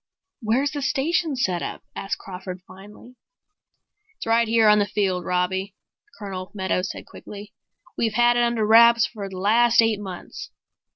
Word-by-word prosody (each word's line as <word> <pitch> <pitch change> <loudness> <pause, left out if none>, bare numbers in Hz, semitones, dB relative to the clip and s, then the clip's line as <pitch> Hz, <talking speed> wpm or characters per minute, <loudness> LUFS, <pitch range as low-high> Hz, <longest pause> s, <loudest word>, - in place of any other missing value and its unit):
"Where's 245 +6 0
the 290 -2 -5
station 305 +3 0
set 185 -9 -1
up?" - - -6
asked 195 - -4
Crawford 185 -1 -9
finally. 210 +6 -15 1.0
"It's - - -7
right 230 0 +2
here 225 -1 +3
on 210 0 +6
the 205 - +1
field, 190 -4 -1
Robbie," 190 +2 -1 0.4
Colonel 190 -3 -7
Meadows 190 -1 -1
said - - -8
quickly. 205 0 -11 0.5
"We've 225 -2 0
had 240 +1 +4
it 240 - +2
under 235 -2 +1
wraps 235 +1 +6
for 200 -4 -7
the 190 - -9
last 230 +5 +3
eight 225 -2 +3
months. 190 -3 -8
210 Hz, 160 wpm, -23 LUFS, 190-235 Hz, 1.0 s, on